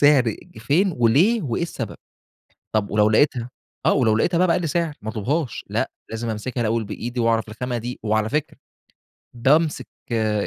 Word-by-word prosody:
سِعر 135 -7 +5 0.2
فين 165 - +2
وليه 150 - +4
وإيه 130 0 -2
السبب. 170 - -4 0.8
طَب 105 -2 +1
ولو 105 0 +3
لقيتها، 120 +1 +2 0.4
آه، - - +5
ولو 115 -6 +3
لقيتها 170 - +2
بقي 180 - +4
بأقل 170 -1 +1
سِعر 165 0 0
ما 110 - -4
اطلُبهاش، 125 +6 -2
لأ، - - -1 0.2
لازم 115 +1 -4
أمسِكها 115 +4 -4
الأول 115 0 +1
بإيدي 120 +4 -4
وأعرف 115 -1 +1
الخامة 120 +3 -3
دي، 120 +2 -5
وعلى 110 0 +1
فكرة 150 +5 -2 0.8
بامسِك 145 +6 +2 0.3
آآ 110 -2 +1
120 Hz, 160 wpm, -23 LUFS, 110-150 Hz, 0.8 s, سِعر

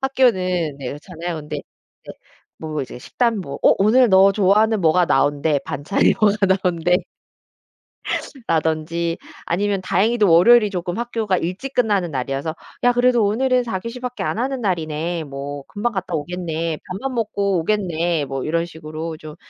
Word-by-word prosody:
학교는 185 - +1
네 135 -3 -5
그렇잖아요. 165 +4 -6
근데 150 0 -6
이제 - - -13 0.5
뭐 155 -2 -4
이제 130 - -8
식단 230 - 0
뭐 140 -6 -6
"어 - - +6
오늘 230 +5 +5
너 190 0 +6
좋아하는 210 +2 +3
뭐가 175 +2 +4
나온대. 145 -3 +2
반찬이 145 +5 +1
뭐가 210 -1 +3
나온대" 180 -2 +2 1.5
라든지 165 +1 0 0.3
아니면 200 +2 0
다행히도 215 -2 +2
월요일이 210 +6 +6
조금 180 -2 -4
학교가 225 -5 -1
일찍 185 +12 -4
끝나는 205 -9 +1
날이어서 135 +4 -3 0.3
"야 245 - +5
그래도 245 -2 +3
오늘은 250 +4 +2
4 225 -6 -3
교시 230 +5 -7
밖에 250 0 -5
안 - - -2
하는 260 +1 -2
날이네. 165 -3 -2
뭐 140 0 -6
금방 225 +4 -2
갔다 190 -2 -4
오겠네. 165 0 -3
밥만 240 +8 -4
먹고 200 -4 0
오겠네." 170 -4 0
뭐 135 -1 -4
이런 165 +2 0
식으로 160 -1 -7
좀 155 -1 -10
180 Hz, 330 characters per minute, -21 LUFS, 160-215 Hz, 1.5 s, 어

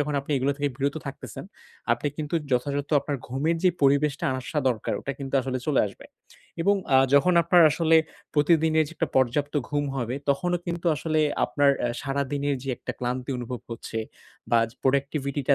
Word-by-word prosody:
যখন 145 0 -1
আপনি 140 +2 -4
এগুলো 135 +2 +1
থেকে 145 0 +1
বিরত 140 +2 -1
থাকতেছেন, 140 - -7 0.5
আপনি - - -2
কিন্তু 155 0 -4 0.2
যথাযথ 140 +3 0
আপনার 145 +1 -3
ঘুমের 150 +7 0
যে 185 - +6
পরিবেশটা 140 +1 +3
আসা 130 +4 -3
দরকার 115 -4 -2
ওটা 140 - -4
কিন্তু 135 0 -5
আসলে 130 0 -2
চলে 150 -4 +3
আসবে। 100 - -11 0.6
এবং 200 +2 +3 0.2
আ - - +8 0.2
যখন 160 +6 +5
আপনার 170 0 +5
আসলে 165 +2 +3 0.4
প্রতিদিনের 160 +1 +3
যে 170 - -10
একটা - - -1
পর্যাপ্ত 135 +4 +1 0.2
ঘুম 145 0 0
হবে, 120 -1 -2 0.2
তখনও 175 +5 0
কিন্তু 170 0 -3
আসলে 155 +1 0 0.2
আপনার 145 -1 +3 0.2
এ - - 0
সারাদিনের 140 0 -1
যে 135 - -7
একটা - - -6
ক্লান্তি 125 +2 -3
অনুভব 125 0 -5
করছে 115 -1 -5 0.5
বা 120 - +5
যে 120 - -20
প্রোডাক্টিভিটি 140 +1 0
টা 140 - +7
140 Hz, 180 wpm, -26 LUFS, 130-150 Hz, 0.6 s, আ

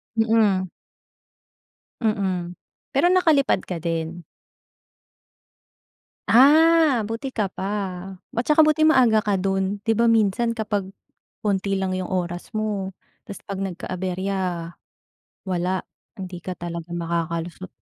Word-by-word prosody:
Mm. 220 -4 +3 1.3
Mm, 190 -6 -1 0.4
pero 285 +6 +4
nakalipad 325 -7 +3
ka 180 - -4
din? 165 +1 -3 2.1
Ah, 295 -1 +5
buti 230 +5 -4
ka 215 -5 -1
pa. 190 - -8 0.7
At 235 - 0
saka 300 +4 +2
buti 310 0 +5
maaga 250 -8 +5
ka 200 -2 0
do'n. 195 +1 -1
'Di 225 +2 0
ba, 230 +1 +4
minsan 225 +1 +2
kapag 210 -4 -3 0.5
konti 195 -2 0
lang 190 -1 -1
'yong 185 0 -4
oras 175 -1 -3
mo 210 -3 -2 0.3
'tas 200 - -9
'pag 195 -1 -3
nagka-aberya, 185 +1 -3 1.1
wala. 185 0 -1 0.3
Hindi 185 -4 -7
ka 180 +2 -6
talaga 170 -1 -6
makakalusot. 170 +1 -3
195 Hz, 110 wpm, -23 LUFS, 185-230 Hz, 2.1 s, Ah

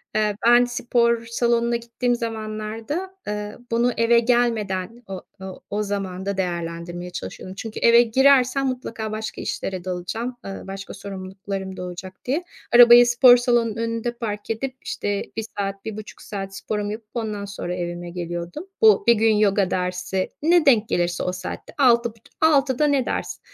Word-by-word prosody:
eee, 210 -1 +1
ben 240 +1 +7
spor 235 -1 +1
salonuna 235 0 +1
gittiğim 235 +1 -1
zamanlarda, 225 - -4
eee, 210 0 -4
bunu 240 +1 +2
eve 230 +1 +4
gelmeden, 230 -3 0
o 190 -1 -6 0.2
o 190 -1 -8
o 210 +1 -1
zamanda 195 -1 -3
değerlendirmeye 175 -1 -4
çalışıyordum. 185 +1 -7
Çünkü 220 +1 -6
eve 235 0 +7
girersem 265 +2 +4
mutlaka 230 -4 -4
başka 215 0 -5
işlere 185 -2 -4
dalacağım, 185 +7 -4
eee, 195 - -5 0.2
başka 195 0 -7
sorumluluklarım 190 0 -6
doğacak 180 +1 -8
diye. 285 +8 0 0.3
Arabayı 240 0 +9
spor 245 +1 +7
salonunun 240 -3 +1
önünde 230 +1 -2
park 210 -3 -5
edip, 255 +4 -3
işte, 205 -1 -2
1 225 - -2
saat, 195 0 -3
1,5 215 -1 -7
saat 195 -1 -6
sporumu 210 0 -3
yapıp 215 0 -8
ondan 215 -4 -3
sonra 195 -3 -5
evime 175 0 -5
geliyordum. 175 - -5
Bu, 215 -3 +6
1 235 - +8
gün 220 0 +3
yoga 200 -2 +2
dersi, 185 +1 -2
ne 335 +2 +4
denk 230 -6 +4
gelirse 175 0 0
o 180 - -1
saatte, 185 0 -7
altı 235 -4 +4
buçu 225 -1 -20 0.2
6.00'da 290 -2 +3
ne 280 -3 +2
ders - - -3
215 Hz, 155 wpm, -23 LUFS, 190-240 Hz, 0.3 s, Arabayı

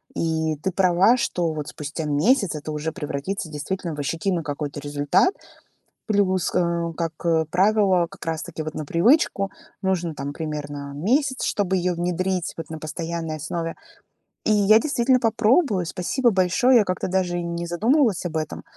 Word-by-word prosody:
И 160 -1 0
ты 190 - 0
права, 185 +5 +4
что 175 -8 0
вот 150 -1 -5
спустя 150 +2 -5
месяц 175 - +2
это 150 +1 -5
уже 155 +1 -3
превратится 160 +2 -4
действительно 165 +3 -4
в 145 - -7
ощутимый 165 +4 -1
какой-то 145 0 -4
результат, 145 - +2 0.7
плюс 190 -4 +1
кэ 170 -1 0
как 165 -1 -3 0.4
правило, 190 -1 +3
как - - -16
раз-таки 160 0 -4
вот 155 0 -6
на 155 - -4
привычку 195 - +2 0.3
нужно, 175 -4 -1
там, 140 0 -5
примерно 145 -3 -5
месяц, 255 - +1
чтобы 190 -3 0
её 180 0 0
внедрить, 180 +1 -1
вот, 165 - -6
на 160 - -6
постоянной 160 +1 -4
основе. 165 +2 -4 0.7
И - - +1
я 210 +1 +6
действительно 260 -2 +2
попробую. 225 - +2
Спасибо 235 +9 0
большое. 195 +7 +4
Я - - +4
как-то 185 - -2
даже 180 -1 0
и 175 - -2
не 170 0 -4
задумывалась 220 - +2
об 160 -2 -2
этом. 155 -1 -4
175 Hz, 155 wpm, -23 LUFS, 155-195 Hz, 0.7 s, я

